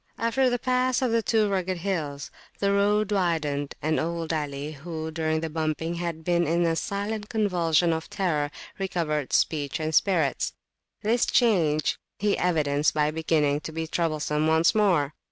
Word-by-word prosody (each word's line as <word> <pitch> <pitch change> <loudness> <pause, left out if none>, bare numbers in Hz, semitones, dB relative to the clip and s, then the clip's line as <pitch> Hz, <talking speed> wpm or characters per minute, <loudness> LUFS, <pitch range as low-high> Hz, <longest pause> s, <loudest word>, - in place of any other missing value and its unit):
After 250 +3 +2
the 245 - 0
pass 255 +1 +1
of 250 - +1
the 230 0 +2
Two 220 -1 +2
Rugged 185 -2 -1
Hills, 160 -6 -3 0.3
the 200 0 +1
road 205 +1 +2
widened, 155 -7 0
and 155 +1 +1
old 165 0 -2
Ali, 145 -1 -3
who, 160 +1 -6
during 160 -1 -1
the 165 - -2
bumping, 160 +1 -2
had 170 -2 -4
been 175 0 +1
in 170 +2 +2
a 165 -1 +1
silent 205 +2 -3
convulsion 175 -6 +2
of 160 0 -4
terror, 155 -7 0 0.3
recovered 160 -7 -2
speech 145 -3 +1
and 155 0 -2
spirits. 160 -7 +2 0.5
This 225 +3 +2
change 165 - +2 0.2
he 210 0 +1
evidenced 150 -4 +1
by 150 0 +2
beginning 155 -2 +1
to 160 - -7
be 160 +1 -3
troublesome 155 -2 0
once 160 +2 +4
more. 180 -9 +2
165 Hz, 160 wpm, -26 LUFS, 155-200 Hz, 0.5 s, once